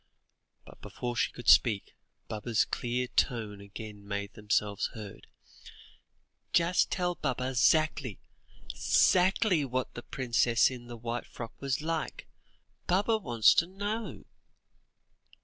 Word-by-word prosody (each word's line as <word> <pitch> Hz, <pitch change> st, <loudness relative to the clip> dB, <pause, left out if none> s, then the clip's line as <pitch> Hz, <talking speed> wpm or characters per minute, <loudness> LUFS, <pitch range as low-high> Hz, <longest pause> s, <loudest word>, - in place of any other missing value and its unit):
But -, -, -16 dB
before 120 Hz, -1 st, -5 dB
she -, -, +1 dB
could 120 Hz, -, -11 dB
speak, 105 Hz, -5 st, +4 dB, 0.3 s
Baba's 110 Hz, +1 st, 0 dB
clear 125 Hz, +1 st, -2 dB
tones 115 Hz, -5 st, -1 dB
again 105 Hz, +1 st, -9 dB
made 100 Hz, 0 st, -4 dB
themselves 105 Hz, -1 st, 0 dB
heard. 105 Hz, -3 st, -9 dB, 1.3 s
"Just 175 Hz, +1 st, +3 dB
tell 180 Hz, -1 st, 0 dB
Baba 130 Hz, -5 st, -2 dB
'zackly 145 Hz, -, +2 dB, 0.6 s
'zackly 185 Hz, -2 st, +3 dB
what 130 Hz, -1 st, -3 dB
the 120 Hz, -, -7 dB
princess 120 Hz, -1 st, +2 dB
in 120 Hz, -2 st, -9 dB
the 120 Hz, -1 st, -8 dB
white 120 Hz, +1 st, -4 dB
frock 115 Hz, -2 st, -8 dB
was 135 Hz, 0 st, -1 dB
like; 160 Hz, -1 st, -3 dB, 0.6 s
Baba 205 Hz, +5 st, +2 dB
wants 120 Hz, -, +4 dB
to 170 Hz, -, +2 dB
know." 205 Hz, +4 st, -5 dB
125 Hz, 115 wpm, -30 LUFS, 110-165 Hz, 1.3 s, speak